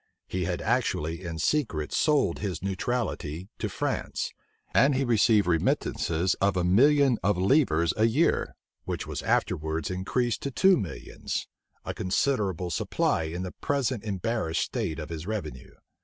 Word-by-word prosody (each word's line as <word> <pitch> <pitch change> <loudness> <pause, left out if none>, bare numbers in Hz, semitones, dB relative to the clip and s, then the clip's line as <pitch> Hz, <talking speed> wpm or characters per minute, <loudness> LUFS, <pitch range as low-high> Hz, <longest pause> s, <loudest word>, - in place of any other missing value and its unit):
He - - -2
had - - -2
actually 80 +3 0
in 85 -2 -5
secret 80 - 0
sold 145 - +2
his 95 -5 -4
neutrality 95 -4 -2
to - - -2
France, - - -2 0.4
and 140 0 +5
he 135 +1 +1
received 110 -3 +4
remittances 85 +1 +1
of 100 -2 +2
a 90 - +1
million 135 +7 +4
of 100 0 +1
livres 90 - +3
a 110 - +3
year, 140 +9 +1 0.3
which - - -3
was - - -4
afterwards 80 +1 0
increased 115 +6 -1
to 140 - -2
two 190 +9 +5
millions; 100 - -4 0.4
a - - -3
considerable 95 - 0
supply 80 +1 0
in 85 +3 -4
the 90 - -5
present 130 -4 -1
embarrassed 105 -4 -1
state 110 -11 -2
of 75 -2 -6
his 80 +1 -6
revenue. 95 - -5
95 Hz, 145 wpm, -27 LUFS, 85-120 Hz, 0.4 s, and